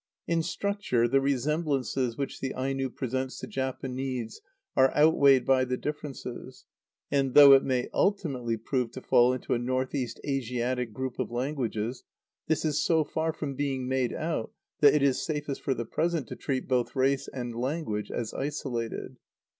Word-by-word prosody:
In 165 -1 +1
structure 195 - 0
the 135 +3 +3
resemblances 135 -3 0
which 140 - -4
the 135 - -3
Aino 135 +1 -1
presents 130 +1 -3
to - - -6
Japanese 130 -2 -4 0.3
are 130 0 +5
outweighed 140 -4 +5
by 130 -1 +4
the 125 0 -1
differences; 145 -4 -6 0.5
and, 135 -2 +1
though 145 -1 +10
it 135 - +6
may 130 -2 0
ultimately 135 - 0
prove 125 +2 -1
to 130 - -7
fall 120 +1 +5
into 130 - -2
a 120 - +1
north 130 +1 -1
east 125 -5 -3
Asiatic 125 -2 -1
group 130 +3 -5
of - - -1
languages, 120 -2 -2 0.4
this 160 0 +1
is 150 -1 +1
so 160 -2 +3
far 160 +2 -1
from 150 -3 -4
being 135 -2 -2
made 130 -2 0
out 155 -8 -3 0.3
that 145 0 +7
it 150 - +3
is 135 -2 +2
safest 145 -3 -3
for 135 - 0
the 120 - -3
present 165 +3 -1
to - - -5
treat 130 -2 -3
both 125 -1 0
race 135 +1 +1
and 120 -2 -5
language 120 -5 -2
as 115 -2 -4
isolated. 135 -5 -4
130 Hz, 165 wpm, -28 LUFS, 125-145 Hz, 0.5 s, though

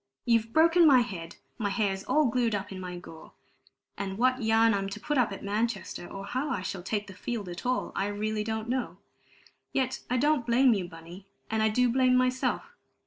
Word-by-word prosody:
You've 230 -1 +2
broken 330 +3 +5
my 260 -4 +7
head; 175 -8 -6 0.2
my 205 -3 0
hair's 195 -2 -1
all 305 0 +3
glued 235 -3 +1
up 200 0 -4
in 190 - -6
my 180 -1 -6
gore; 165 -2 -12 0.6
and 195 -1 -4
what 255 +2 +2
yarn 225 0 +4
I'm 195 -1 -1
to 195 - -7
put 295 0 -2
up 250 -6 +2
at 195 - -7
Manchester, 205 -3 -2
or 195 0 -7
how 260 +8 -2
I 235 -9 -2
shall 190 -1 -4
take 205 +3 -2
the 190 - -11
field 215 0 -4
at 175 +7 -6
all, 255 - 0
I 195 - 0
really 210 +1 -2
don't 220 0 -3
know. 255 +1 -2 0.7
Yet 260 -1 -1
I 250 - +1
don't 290 0 +2
blame 240 +2 +4
you, 190 -4 -2
Bunny, 170 +3 -12 0.2
and 220 0 +1
I 220 - +3
do 250 +3 +3
blame 255 +1 +3
myself. 255 0 0
220 Hz, 205 wpm, -28 LUFS, 195-250 Hz, 0.7 s, my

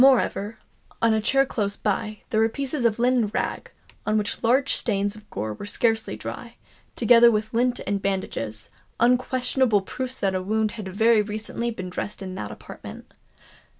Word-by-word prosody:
Moreover, 230 -5 +3 0.4
on 230 -1 +4
a 220 - +2
chair 270 +5 +3
close 205 -6 -2
by, 210 +1 -2
there 220 - +2
were 225 0 +4
pieces 275 +1 -2
of 220 -2 +3
linen 245 -1 +3
rag, 205 - -3 0.3
on 215 - +1
which 205 -1 -2
large 255 +4 +3
stains 205 -2 0
of 215 0 -15
gore 105 +2 -3
were 205 - -8
scarcely 225 +1 0
dry, - - -7 0.4
together 235 0 +7
with 215 0 -1
lint 245 +1 +1
and 200 -1 -1
bandages—unquestionable 215 - 0
proofs 260 +6 -5
that 195 -1 +1
a 185 - -1
wound 215 +2 0
had 215 -4 -7
very 220 +4 +4
recently 220 +3 -2
been 185 -5 -6
dressed 205 +2 -5
in 185 -1 -6
that 190 - -5
apartment. - - -10
220 Hz, 165 wpm, -25 LUFS, 200-240 Hz, 0.4 s, together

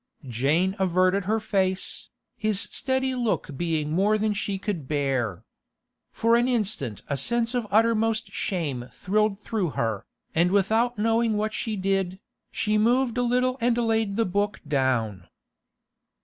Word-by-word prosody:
Jane 150 - +1
averted 185 +1 +2
her 220 +3 +1
face, 190 -3 -1 0.3
his 215 -2 0
steady 260 0 -1
look 235 - -1
being 155 -1 -1
more 200 +6 +3
than 215 0 0
she 200 -1 -2
could 190 -8 -4
bear. 135 - -1 0.7
For 230 +1 +2
an 240 +1 +3
instant 205 - -2
a 140 - -1
sense 235 - 0
of 245 -3 -1
uttermost 225 0 +2
shame 140 -10 -3
thrilled 210 +1 0
through 210 -4 -2
her, 110 -3 -1 0.3
and 170 +2 +3
without 220 +5 +2
knowing 225 0 +2
what 215 +1 -1
she 220 -2 -2
did, 190 -1 -1 0.3
she 215 -1 +1
moved 240 +2 +2
a 245 - +1
little 250 +1 +1
and 240 0 +2
laid 225 -3 +1
the 225 +1 +2
book 205 +3 -1
down. 120 - 0
205 Hz, 145 wpm, -25 LUFS, 165-225 Hz, 0.7 s, more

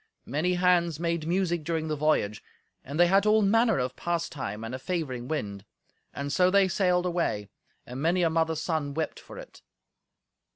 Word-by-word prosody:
Many 160 +7 0
hands 175 -3 +2
made 170 -2 -1
music 175 -2 0
during 160 0 -2
the 155 - -1
voyage, 145 -9 0 0.4
and 140 +4 -6
they 175 - +7
had 195 +4 +3
all 215 0 +4
manner 225 +1 +3
of 125 0 -2
pastime, 150 -11 -3
and 115 +2 -6
a 130 - -4
favouring 130 -7 -3
wind. 105 -10 -4 0.5
And 140 0 -4
so 180 0 +4
they 195 0 +4
sailed 180 -1 +1
away; 170 - -1 0.4
and 125 +2 -7
many 175 +3 +2
a 165 - +3
mother's 160 -1 0
son 155 -4 -2
wept 160 0 -3
for - - -12
it. - - -12
165 Hz, 175 wpm, -27 LUFS, 140-180 Hz, 0.5 s, they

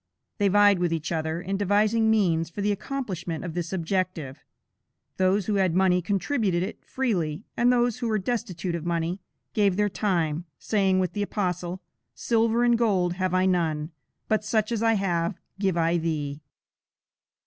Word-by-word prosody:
They 205 - +3
vied 205 -1 +5
with 175 -1 +1
each 165 -2 -2
other 160 0 -1
in 195 +2 -3
devising 210 +3 +2
means 170 -7 +2
for 185 +5 -6
the 205 +1 +1
accomplishment 195 - -4
of 170 - -5
this 175 -1 -3
object. 185 0 -1 1.0
Those 190 +1 +2
who 210 -2 0
had 185 -3 +2
money 185 -1 +3
contributed 195 - 0
it 195 - -6
freely, 195 - -1
and 240 +1 +4
those 245 -1 +1
who 240 - -2
were 215 -1 +1
destitute 190 -5 -3
of 170 -2 -3
money, 170 +2 -1 0.3
gave 200 -3 +3
their 210 0 +2
time, 175 -5 -1
saying 195 -3 +1
with 185 -1 0
the 205 - -2
Apostle: 180 -3 -2 0.3
"Silver 230 0 +2
and 240 -1 +3
gold 190 -7 +2
have 185 0 -1
I 185 0 +3
none; 165 -4 0 0.4
but 215 0 +1
such 215 +1 0
as 225 -2 -1
I 225 0 +4
have, 175 -5 0 0.2
give 190 -3 +1
I 165 +1 +2
thee." 150 -3 -3
190 Hz, 170 wpm, -26 LUFS, 170-210 Hz, 1.0 s, vied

